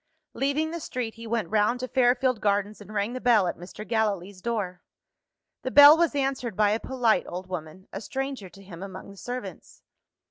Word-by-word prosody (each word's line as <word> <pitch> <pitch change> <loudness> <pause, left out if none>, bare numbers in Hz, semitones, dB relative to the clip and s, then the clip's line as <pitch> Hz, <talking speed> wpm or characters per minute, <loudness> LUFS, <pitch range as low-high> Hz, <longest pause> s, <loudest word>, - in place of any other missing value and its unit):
Leaving 285 +4 0
the 340 - -4
street, 250 -7 -4
he 230 0 -10
went 220 -5 -2
round 220 +3 +2
to 255 - -3
Fairfield 255 -1 +2
Gardens, 205 +1 0
and 205 - -12
rang 210 +2 -1
the 255 - -5
bell 230 -6 +4
at 175 - -2
Mr. 190 +5 -10
Gallilee's 200 -4 -1
door. 195 -6 -3 0.8
The 260 - -3
bell 290 +3 +10
was 335 -2 +1
answered 270 -5 -1
by 210 -1 +4
a 215 - +1
polite 245 -4 +1
old 180 +2 -6
woman 180 +1 -7
a 195 - -5
stranger 265 -4 -4
to 195 +2 -16
him 180 -3 -11
among 190 0 -8
the 200 - -15
servants. 245 +4 -8
220 Hz, 190 wpm, -26 LUFS, 195-255 Hz, 0.8 s, bell